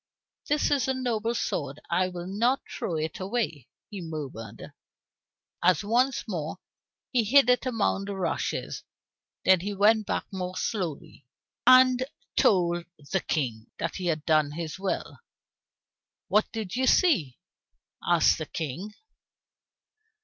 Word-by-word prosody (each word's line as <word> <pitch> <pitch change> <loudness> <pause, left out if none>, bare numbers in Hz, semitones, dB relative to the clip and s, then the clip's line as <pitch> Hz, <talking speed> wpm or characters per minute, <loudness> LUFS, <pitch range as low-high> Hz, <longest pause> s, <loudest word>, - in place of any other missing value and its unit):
"It 295 +1 +2
is 275 -4 +2
a 265 - +1
noble 235 -3 -1
sword; 140 - -2
I 180 +2 +2
will 175 -1 -6
not 230 +8 +1
throw 170 - -4
it 155 0 -3
away," 185 - -2 0.2
he 200 -3 -6
murmured, 140 -10 -7 0.9
as 185 +3 +3
once 245 +5 +2
more 160 -6 -4 0.5
he 245 -3 +3
hid 250 +3 +5
it 250 +1 +1
among 215 -5 0
the 200 0 -4
rushes. 190 - -2 0.6
Then 190 -1 +6
he 200 +3 -4
went 215 +2 +4
back - - -1
more 185 -1 -4
slowly, 180 -10 -4 0.4
and 255 0 +7 0.3
told 175 -3 +3 0.3
the 190 - +2
King 120 -8 -2
that 165 - -3
he 180 - -3
had 155 -3 -1
done 155 -2 +3
his 165 +2 -5
will. 195 0 -3 1.1
"What 210 - +2
did 220 -3 -4
you 260 +1 +1
see?" 185 - +3 0.7
asked - - +4
the - - -4
King. 170 +7 -5
190 Hz, 135 wpm, -27 LUFS, 160-230 Hz, 1.1 s, and